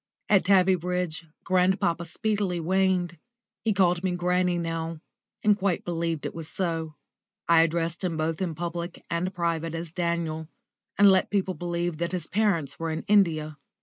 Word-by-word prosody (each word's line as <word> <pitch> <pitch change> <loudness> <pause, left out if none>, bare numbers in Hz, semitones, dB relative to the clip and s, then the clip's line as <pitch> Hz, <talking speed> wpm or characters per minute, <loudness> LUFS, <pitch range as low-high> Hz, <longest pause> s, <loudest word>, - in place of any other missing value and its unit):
At 195 -3 +4
Tavybridge 180 -3 +2 0.2
grandpapa 185 -2 +2
speedily 200 0 -1
waned. 180 0 +1 0.4
He 220 - +2
called 180 -3 +2
me 185 -1 0
"Granny" 180 0 +1
now, 165 -1 -3 0.4
and 210 -1 +5
quite 195 -3 -1
believed 165 -2 -2
it - - -3
was 165 -2 -6
so; 165 -4 -2 0.5
I 165 -1 +6
addressed 165 +1 0
him 170 -3 -1
both 160 +2 -1
in 170 -4 -2
public 170 +1 -5
and 170 +2 -1
private 165 -2 -2
as 165 -1 -5
"Daniel," 170 -2 -2 0.5
and 205 - +7
let 190 - +3
people 190 -2 0
believe 175 -2 -2
that 170 +1 -2
his 175 -4 -2
parents 175 -10 0
were 165 0 -2
in 160 +1 -3
India. 160 -7 +2
175 Hz, 155 wpm, -26 LUFS, 165-185 Hz, 0.5 s, and